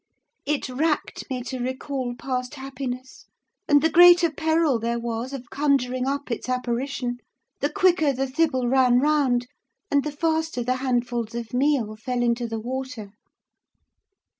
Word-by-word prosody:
It 295 -1 0
racked 295 +5 -2
me 255 -2 -3
to 260 0 -5
recall 255 0 -3
past 255 +1 -3
happiness 265 -2 -7 0.4
and 290 -1 +5
the 320 - +4
greater 350 -1 +7
peril 315 -4 +1
there 235 +1 -1
was 235 +2 -4
of 255 -3 -8
conjuring 265 -3 +1
up 280 -1 -2
its 235 - -4
apparition, 250 0 -2 0.4
the 285 - 0
quicker 350 -3 +3
the 270 0 -1
thible 260 -2 0
ran 250 -1 +4
round, 270 -4 +2 0.5
and 285 -1 +3
the 300 - -3
faster 320 -3 -1
the 255 +2 0
handfuls 240 -3 -1
of 235 -1 -5
meal 250 -5 +1
fell 245 +3 -2
into 235 0 0
the 225 -1 -4
water. 255 -3 -5
260 Hz, 145 wpm, -24 LUFS, 245-290 Hz, 0.5 s, greater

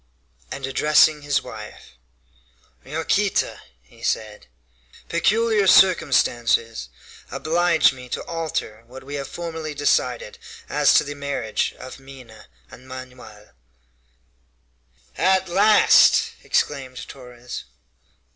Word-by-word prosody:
And 135 - -5
addressing 150 +3 +3
his 145 -1 0
wife: 110 -4 -11 0.9
"Yaquita," 165 +7 -1 0.2
he - - -21
said, 105 -6 -3 0.6
"peculiar 210 +4 +2
circumstances 120 - +3 0.4
oblige 170 -1 +2
me 125 -1 -12
to - - -4
alter 160 -9 -4
what 130 +2 -12
we 140 +2 -9
have 140 -1 -4
formerly 160 -3 -6
decided 465 - -1 0.3
as - - +3
to - - +5
the 145 0 -6
marriage 140 -6 -3
of 130 +1 -10
Minha 130 -5 -14 0.2
and 130 +1 -14
Manoel." 125 -5 -12 1.7
"At 190 0 +2
last!" 205 +4 +5
exclaimed 130 -3 -2
Torres. 125 -2 -10
140 Hz, 100 wpm, -22 LUFS, 125-170 Hz, 1.7 s, to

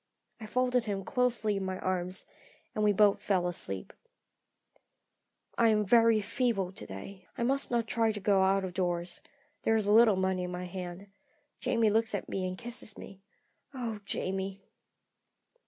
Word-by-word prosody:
I 220 - -8
folded 250 +1 +1
him 200 -2 -2
closely 240 -5 +1
in 195 - -2
my 190 0 -3
arms, 185 0 -2 0.5
and 215 - -1
we 210 - +5
both 205 0 +4
fell 185 -3 +1
asleep. 100 - -4 1.7
"I 230 - +6
am 210 -1 +3
very 230 +1 +5
feeble 215 -3 0
to - - -9
day. 180 - -9
I - - -1
must 275 +3 +2
not 235 -2 +1
try 225 -1 +1
to 210 - -5
go 200 -1 +3
out 190 0 +3
of 180 - -6
doors. 175 -1 -1 0.4
There 225 - +2
is 215 -2 +1
a 205 - +2
little 225 -2 +7
money 190 0 0
in 180 - -5
hand. 180 +2 -6 0.5
Jamie 230 -4 +2
looks 220 0 +1
at 200 - -4
me 185 -1 -2
and 185 0 -5
kisses 235 -2 -6
me. 195 0 -11 0.5
Oh, 230 -4 -3
Jamie!" 195 0 -3
200 Hz, 165 wpm, -30 LUFS, 185-225 Hz, 1.7 s, little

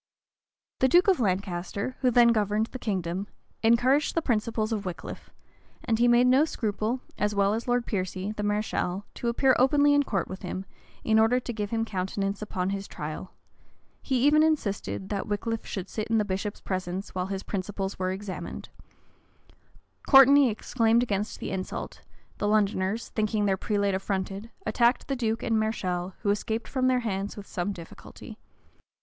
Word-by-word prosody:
The 260 - +4
duke 350 +8 +5
of 380 -6 +4
Lancaster, 195 +2 -2
who 255 - +4
then 240 0 +6
governed 215 -1 +2
the 255 - -6
kingdom, 190 -3 -2 0.3
encouraged 245 +6 +3
the 330 - +2
principles 220 -2 0
of 210 -2 -2
Wickliffe; 180 -3 -7 0.5
and 225 -1 0
he 240 - +5
made 240 +1 +5
no 260 +3 +5
scruple, 225 -3 -2 0.2
as 210 0 0
well 200 0 +3
as 225 +3 -3
Lord 245 -1 +1
Piercy, 185 0 -3
the 215 - -5
mareschal, 205 -2 -1
to 240 - -4
appear 260 +3 +3
openly 290 +3 +5
in 285 - +5
court 200 -9 -1
with 185 - -8
him, 185 +1 -5 0.4
in 220 0 +3
order 225 +3 +4
to 240 - -5
give 210 -2 -3
him 225 0 0
countenance 195 0 -2
upon 190 -3 -2
his 195 0 -4
trial: 155 +3 -7 0.7
he 260 -1 +1
even 300 +1 +6
insisted, 230 -11 -1
that 200 0 -3
Wickliffe 220 +2 -3
should 190 -2 -4
sit 215 +1 -4
in 225 0 +2
the 210 - +2
bishop's 200 +1 -3
presence 185 0 -4
while 185 0 -2
his 195 0 -4
principles 195 0 -4
were 185 0 0
examined: 190 0 -6 1.4
Courteney 270 0 +8
exclaimed 230 +1 +2
against 210 -3 -2
the - - -4
insult: 190 -1 -5 0.4
the 205 - 0
Londoners, 205 0 +1
thinking 215 -1 0
their 195 -1 +2
prelate 200 0 0
affronted, 195 +2 -3 0.2
attacked 240 +1 +2
the 275 - -1
duke 225 -2 -1
and 225 -1 +1
mareschal, 185 -4 -2
who 200 - +3
escaped 220 +2 -2
from 260 -2 0
their 255 -1 +2
hands 200 -3 -3
with 205 - -8
some 180 +2 -3
difficulty. 170 -4 -11
210 Hz, 170 wpm, -27 LUFS, 195-235 Hz, 1.4 s, Courteney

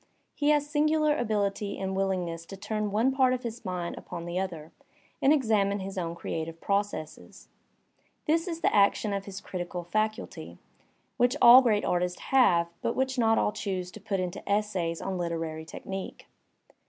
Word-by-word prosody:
He 290 0 +1
has 295 -1 +3
singular 305 0 +2
ability 205 -4 -1
and 190 0 -3
willingness 180 -4 -2
to 195 - -8
turn 210 +1 -2
one 225 +6 +2
part 260 -1 +3
of 250 - -7
his 235 0 -6
mind 180 -3 -4
upon 170 -1 -7
the 175 +1 -2
other 165 -5 -5 0.5
and 275 - +5
examine 215 -8 +2
his 195 0 -6
own 170 -2 -3
creative 165 -1 -5
processes. 200 -6 -3 0.8
This 330 +3 +1
is 330 -2 -4
the - - +2
action 205 +1 +3
of 195 0 -3
his 195 -1 -7
critical 175 -2 -5
faculty, 215 +6 -3 0.6
which 245 +1 +3
all 245 +2 +10
great 215 -5 +2
artists 180 0 0
have, 185 -11 +3
but 230 - -1
which 265 0 0
not 225 -1 +4
all - - +2
choose 185 -3 -4
to 215 - -12
put 200 -1 -2
into 180 -1 -3
essays 190 -5 0
on 190 -1 -3
literary 165 -2 -3
technique. 190 +3 -7
200 Hz, 165 wpm, -28 LUFS, 180-235 Hz, 0.8 s, all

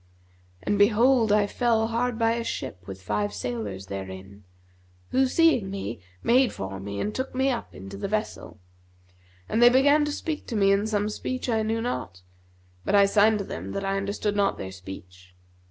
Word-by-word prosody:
And 205 - 0
behold 225 +2 +4
I 210 0 +4
fell 225 +1 +1
hard 235 +1 -1
by 225 -1 +2
a 235 0 -1
ship 100 - -5
with 95 -1 -8
five 105 +1 -1
sailors 105 -4 -4
therein, 95 +1 -8 0.7
who 265 0 +3
seeing 255 - +3
me, 190 - -5 0.2
made 255 +2 +4
for 95 0 -6
me 100 +1 -5
and 210 - -2
took 260 0 -4
me 265 +1 +2
up 240 - -5
into 95 +1 -9
the 200 - -3
vessel; 210 - -4 0.9
and 225 - 0
they 240 - +9
began 285 +4 +4
to 295 - -2
speak 305 +1 -4
to 230 - -4
me 195 -2 +4
in 200 +2 +2
some 210 -1 0
speech 255 +5 -4
I 225 -2 +2
knew 225 +1 -1
not; 90 - -4 0.6
but 205 - +1
I 200 0 +7
signed 210 +2 +4
to 200 - -4
them - - -6
that 195 0 -3
I 195 0 0
understood 200 +1 -2
not 200 -1 +1
their 95 0 -6
speech. 95 -1 -11
205 Hz, 185 wpm, -26 LUFS, -, 0.9 s, they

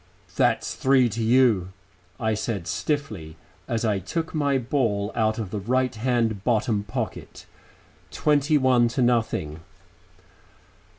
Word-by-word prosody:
"That's - - +1
three 130 -2 +3
to 115 +2 -4
you," 110 -6 +3 0.5
I 110 -2 0
said 105 -4 -3
stiffly, 110 - -3 0.3
as 115 -1 -1
I 105 -3 +1
took 160 - -4
my 145 -3 +1
ball 115 -6 -1
out 110 -1 0
of 105 -5 -5
the 105 - -3
right 125 +5 0
hand 115 -3 0
bottom 110 -3 +1
pocket. 105 - -6 0.6
"Twenty 150 0 +2
one 130 -3 +4
to 125 +2 0
nothing." 110 -11 0
115 Hz, 125 wpm, -24 LUFS, 105-130 Hz, 0.6 s, one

